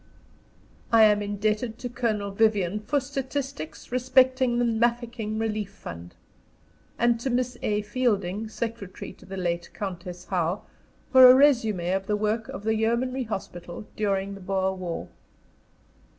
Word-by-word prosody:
I 225 -1 +7
am 210 -1 +5
indebted 215 +3 -1
to 250 - -5
Colonel 215 -4 -1
Vyvyan 210 -2 +2
for 285 +3 +2
statistics 270 - -5
respecting 255 0 +3
the 240 - +2
Mafeking 235 -1 0
Relief 215 -2 -2
Fund; 85 - -10 0.8
and 235 0 +3
to 265 - -2
Miss 250 0 0
A. 210 0 0
Fielding, 210 -3 -1
secretary 215 -2 -5
to - - -18
the 195 0 -6
late 175 -1 -2
Countess 180 -2 -6
Howe, 180 +1 -1 0.5
for 260 -1 +10
a 250 - +9
résumé 220 -10 +3
of 195 0 -3
the 210 - +1
work 215 +2 -1
of 195 - -7
the 220 +1 +1
Yeomanry 240 +4 0
Hospital 185 -3 -6
during 200 -2 -1
the 195 - -10
Boer 190 0 0
War. 180 -3 -5
215 Hz, 140 wpm, -26 LUFS, 195-240 Hz, 0.8 s, for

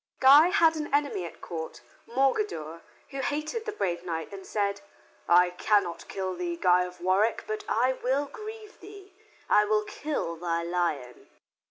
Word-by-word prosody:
Guy 280 +5 +8
had 335 -4 +4
an 300 -1 -4
enemy 285 -10 0
at 170 - -10
court, 160 -2 -6 0.3
Morgadour, 250 - -1 0.3
who 275 - -5
hated 305 - -2
the 430 - -2
brave 175 - -2
knight 165 +1 -4
and 195 -1 -9
said, 200 -1 -1 0.5
"I 180 +1 +6
cannot 180 -2 0
kill 190 -1 -3
thee, 175 -1 -3
Guy 180 +1 +4
of 180 0 -10
Warwick, 195 +5 +2
but 215 0 -4
I 250 +3 +2
will 265 +3 0
grieve 430 +3 -10
thee. 400 -1 -13 0.3
I 210 - +5
will 215 0 +2
kill 210 - -4
thy 170 0 -2
lion." 170 - -3
210 Hz, 160 wpm, -28 LUFS, 175-290 Hz, 0.5 s, Guy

